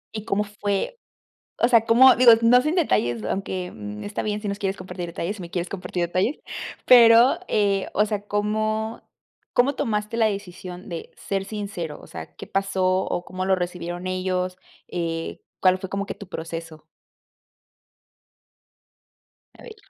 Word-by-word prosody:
¿Y 215 - -4
cómo 205 +1 +1
fue? 205 - -3 0.6
O 235 - +4
sea, 230 -2 +5
¿cómo? 255 +3 +8
Digo, 245 -2 +9
no 245 +2 +6
sin 305 +6 0
detalles, 120 - +1
aunque, 185 - -3
mm, 105 0 -7
está 205 - -3
bien 210 0 -2
si 205 - -3
no 200 - -2
quieres 195 -1 -2
compartir 185 -1 -6
detalles, 170 +5 -4
si - - -8
me 170 - -7
quieres 175 0 -3
compartir 180 -2 -3
detalles, 185 - 0 0.5
pero, 235 0 +7
eh, 200 -2 +1
o 210 - +3
sea, 205 -1 -4
¿cómo 215 +2 -1 0.5
cómo 265 +4 +3
tomaste 215 0 -2
la 225 - +4
decisión 185 -2 -5
de 170 -2 -6
ser 195 -1 -3
sincero? 200 -7 -5
O - - -14
sea, 80 -1 -9
¿qué - - -9
pasó 195 -1 -1
o 185 -1 0
cómo 185 +1 -4
lo 190 0 +3
recibieron 175 0 -4
ellos? 185 0 -1 0.3
Eh, 165 -2 -3 0.2
¿cuál 185 0 +5
fue 190 -1 -7
como 200 +1 -2
que - - -5
tu 200 - -11
proceso? 165 -3 -7 2.7
A - - -13
ver. 445 -2 -10
195 Hz, 165 wpm, -24 LUFS, 180-215 Hz, 2.7 s, Digo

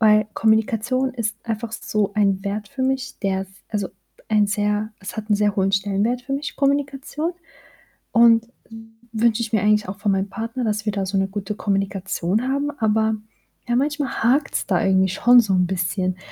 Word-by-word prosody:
Weil 215 -1 +5
Kommunikation 225 +4 +1
ist 215 -4 -3
einfach 225 0 -3
so 210 -3 -1
ein 195 -2 +2
Wert 205 +1 -3
für 265 +1 -4
mich, 265 0 -1
der 190 -2 0
s 190 - -11 0.2
also, 205 -3 -2 0.4
ein 210 -1 +3
sehr 210 +1 -1
es 195 +3 -7
hat 220 0 -5
'n 210 - +3
sehr 205 -1 +1
hohen 195 0 +2
Stellenwert 205 +5 0
für 270 - -6
mich, 285 +2 -3
Kommunikation. 280 +3 -1 0.8
Und 230 0 +5 0.6
wünsche 230 0 +2
ich 230 -1 -3
mir 210 - +3
eigentlich 210 -2 +2
auch 195 - -7
von 205 -2 +1
meinem 195 +1 -1
Partner, 230 +4 -4
dass 215 -1 -1
wir 210 - 0
da 195 -2 -1
so 195 +1 -2
'ne 195 0 +2
gute 200 +1 -4
Kommunikation 195 +2 -1
haben, 280 +2 0
aber 220 0 +2 0.5
ja, 240 - +1
manchmal 285 -1 -1
hakt's 275 +5 +2
da 180 -3 +2
irgendwie 190 0 +3
schon 240 +6 +6
so 210 -4 -3
'n 180 -1 +3
bisschen. 185 0 -1
215 Hz, 185 wpm, -22 LUFS, 195-240 Hz, 0.8 s, schon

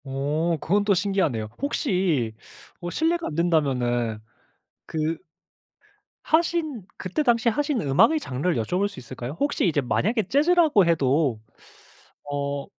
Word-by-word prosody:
어 150 +5 -1
그건 205 +7 +1
또 205 -1 +3
신기하네요. 180 - 0
혹시 180 - 0 0.5
어 175 - -5
실례가 330 - 0
안 150 - -5
된다면은 125 -9 +1 0.7
그 160 +1 -2 1.1
하신 315 - 0
그때 190 - -2
당시에 235 -2 +3
하신 290 +2 -1
음악의 195 - +4
장르를 150 - -2
여쭤볼 180 - 0
수 205 - -10
있을까요? 125 +2 -7
혹시 285 -8 +1
이제 150 -4 +1
만약에 215 - 0
재즈라고 305 - +4
해도 140 -6 +2 0.9
어 140 0 -2
170 Hz, 270 characters per minute, -24 LUFS, 140-235 Hz, 1.1 s, 음악의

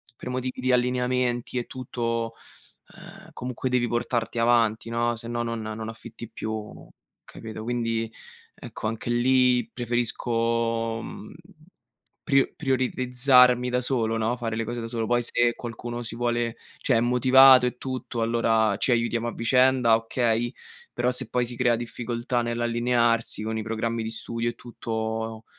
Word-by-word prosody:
per 125 - -8
motivi 130 0 -3
di 130 0 +1
allineamenti 125 0 0
e 120 - -4
tutto, 115 -2 -3 0.6
ehm, - - -13
comunque 125 +1 -4
devi 125 -1 +1
portarti 120 0 -2
avanti 115 -1 +2
no, 120 0 0
se 115 - -7
no 120 0 -2
non 115 -1 -3
non 110 +1 -5
affitti 115 0 -9
più, 110 -1 -6 0.4
capito. 110 -1 -9
Quindi 115 -1 -2 0.4
ecco, - - -9
anche 115 +2 -4
lì 125 -1 +3
preferisco 115 -1 -1
mhmm, - - -9 0.9
pri 135 -1 +2
prioritizzarmi 125 -2 +3
da 125 - +1
solo 115 -3 0
no, 115 +2 0
fare 115 -2 -3
le 115 - -2
cose 120 +1 -4
da 115 - -5
solo 115 -1 -2
poi 120 0 +2
se 120 0 +2
qualcuno 120 0 -6
si 115 0 -5
vuole 120 -1 -1 0.2
cioè 125 - +1
è - - +2
motivato 130 +1 +7
e 125 - -4
tutto, 130 -2 -4
allora 115 -2 +2
ci 125 - +1
aiutiamo 120 0 +1
a 120 - -3
vicenda 125 -1 +4
okay, 115 +1 0 0.4
però 120 +1 0
se 125 -2 -2
poi 125 0 0
si 120 0 -4
crea 120 -2 +3
difficoltà 120 +1 -3
nell'allinearsi, 120 -1 +1
con 110 0 -3
i 110 - -3
programmi 115 +1 -2
di 110 - -3
studio 115 +1 -2
e 120 - -7
tutto, 110 -1 -4
120 Hz, 150 wpm, -25 LUFS, 115-125 Hz, 0.9 s, motivato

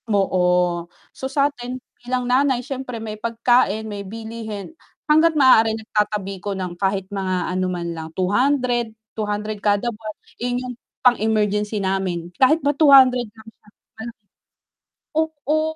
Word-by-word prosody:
Oo, 195 -3 +1 0.8
so - - -7
sa'tin 270 -3 -1 0.2
bilang 250 +1 -2
nanay 255 0 +2
siyempre 265 -3 -5
may 215 -1 -7
pagkain, 230 -2 +2
may 205 -2 -5
bilihin, 220 +3 -7 0.3
hangga't 315 +1 +4
maaari 225 -5 +5
nagtatabi 210 -3 -2
ko 200 0 -3
ng 180 -2 -4
kahit 195 -1 0
mga 185 -2 -2
ano 185 0 0
man 170 -2 -3
lang 160 -1 -6
200, 240 +4 +1 0.2
200 210 -1 -3
kada 205 +1 +1
buwan, 215 0 -8 0.3
eh, 245 0 -1
'yung 250 0 -4 0.3
pang-emergency 210 -3 +2
namin 185 -3 -2
kahit 265 +5 +6
ba 290 - +3
200 265 -5 +6
lang 220 0 -18
siya 210 - -25 0.3
ano. 235 +1 -6 1.0
Oo, 315 0 0
220 Hz, 135 wpm, -21 LUFS, 200-255 Hz, 1.0 s, kahit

